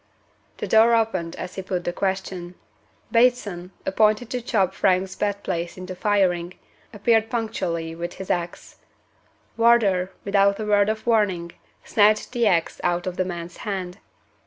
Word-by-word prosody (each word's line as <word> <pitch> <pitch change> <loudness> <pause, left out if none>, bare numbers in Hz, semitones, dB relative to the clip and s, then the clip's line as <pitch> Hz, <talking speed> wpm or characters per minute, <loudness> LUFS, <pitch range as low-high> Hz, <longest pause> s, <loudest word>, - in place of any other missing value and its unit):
The - - -4
door 225 +1 +5
opened 190 -7 -1
as 180 - -7
he 190 - -5
put 185 -1 -3
the 175 - -2
question. 190 -2 -3 0.6
Bateson 230 -7 +2 0.2
appointed 215 +4 +2
to 250 - -2
chop 205 -6 +1
Frank's 190 0 +1
bed 205 -1 -2
place 170 +1 -3
into 185 0 -6
firing 180 -3 +1 0.4
appeared 225 +1 +2
punctually 180 -8 -2
with 170 +1 -5
his 190 - -5
ax. 175 -1 -4 0.8
Wardour, 215 -6 +4 0.2
without 200 0 +3
a 215 - -3
word 205 0 +3
of 220 0 -3
warning, 200 -7 +1 0.3
snatched 215 +1 +3
the 240 -3 +1
ax 170 -4 +1
out 175 0 0
of 185 -1 -3
the 185 - 0
man's 170 -1 -6
hand. 190 -2 -5
195 Hz, 150 wpm, -23 LUFS, 180-215 Hz, 0.8 s, door